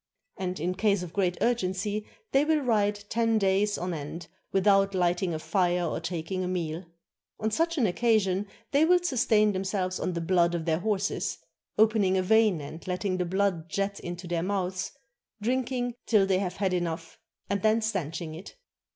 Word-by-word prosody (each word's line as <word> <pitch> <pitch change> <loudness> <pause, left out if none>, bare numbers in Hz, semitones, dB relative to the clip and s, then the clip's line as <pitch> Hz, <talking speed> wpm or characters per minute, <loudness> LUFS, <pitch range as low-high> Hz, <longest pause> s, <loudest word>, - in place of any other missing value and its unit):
And 185 -2 -3
in 175 +4 -1
case 200 -1 +1
of 175 -1 -8
great 180 -3 +1
urgency 210 -2 0 0.2
they 275 +1 +4
will 310 0 +2
ride 205 -5 +1
ten 230 -1 +2
days 200 +1 +2
on 180 0 -3
end 165 +2 -6 0.2
without 195 0 +3
lighting 175 0 +1
a 160 - -2
fire 180 +1 +1
or 160 - -2
taking 180 +2 -3
a - - -2
meal. 175 -1 -3 0.5
On 220 0 -1
such 335 +8 +1
an 255 - +3
occasion 205 -1 +2 0.2
they 285 +2 +4
will 360 +3 +6
sustain 220 -8 +3
themselves 190 -1 -2
on 180 - -1
the 170 - -2
blood 170 0 +2
of 165 -2 -3
their 160 -1 +1
horses, 205 0 -1 0.4
opening 210 -3 +4
a 185 - +1
vein 215 -4 +4
and 160 +5 -9
letting 185 +1 -1
the 180 - 0
blood 180 -2 0
jet 200 +3 -2
into 175 +1 -6
their 170 -1 -1
mouths, 185 0 -2 0.5
drinking 245 +2 -1
till 210 -4 +4
they 190 -1 +2
have 180 -2 -2
had 195 -2 0
enough, 170 -2 -3 0.3
and 200 0 -1
then 220 +2 +3
stanching 170 -7 -3
it. 170 +5 -10
190 Hz, 175 wpm, -28 LUFS, 175-215 Hz, 0.5 s, will